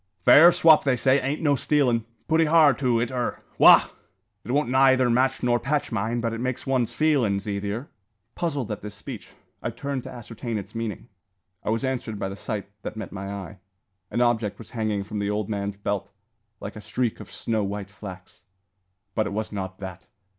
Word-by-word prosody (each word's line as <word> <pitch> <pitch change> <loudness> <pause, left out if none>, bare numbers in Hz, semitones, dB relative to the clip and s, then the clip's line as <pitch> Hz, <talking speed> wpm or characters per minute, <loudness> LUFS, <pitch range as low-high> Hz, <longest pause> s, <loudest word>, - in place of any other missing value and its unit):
"Fair 170 +4 +9
swop, 160 -2 +6
they 135 -3 +2
say, 130 +3 +3
ain't 140 +4 -2
no 145 -2 +4
stealin'. 130 -5 +1 0.2
Putty 160 +1 +3
har, 155 -2 +6
too, 125 -2 +1
it 120 +1 -1
ur. 125 -2 -2 0.2
Wagh! - - +8 0.5
It - - -12
won't 140 -2 +1
neyther 130 -1 +4
match 130 +3 +1
nor 120 -1 +3
patch 145 +2 -1
mine; 115 +2 -1
but 115 -1 -1
it 115 - -4
makes 130 0 -3
one's 125 -3 0
feelin's 120 -11 +1
easier." 100 +6 -3 0.5
Puzzled 145 - -2
at 105 - -4
this 105 0 -8
speech, 105 -2 -9 0.3
I - - -2
turned 135 +3 -4
to - - -6
ascertain 115 -1 -6
its 100 0 -7
meaning. 115 -1 -4 0.6
I - - -3
was 115 +3 0
answered 125 -5 -3
by 95 -1 -3
the 95 - -6
sight 105 -1 -5
that 110 - -6
met 110 -4 -6
my 100 +1 -6
eye. 100 0 -7 0.5
An 120 - -1
object 115 -4 +1
was 115 - -12
hanging 110 -3 -1
from 105 +1 -5
the 100 0 -1
old 105 0 -2
man's 100 -1 -3
belt, 100 0 -3 0.5
like 100 - -7
a 110 - -8
streak 120 +1 -2
of 105 - -10
snow 110 -2 -1
white 100 0 -4
flax. 95 -3 -11 0.7
But 110 - 0
it - - -5
was 110 +1 -3
not 95 -2 -5
that. 95 -1 -9
115 Hz, 195 wpm, -25 LUFS, 100-130 Hz, 0.7 s, Fair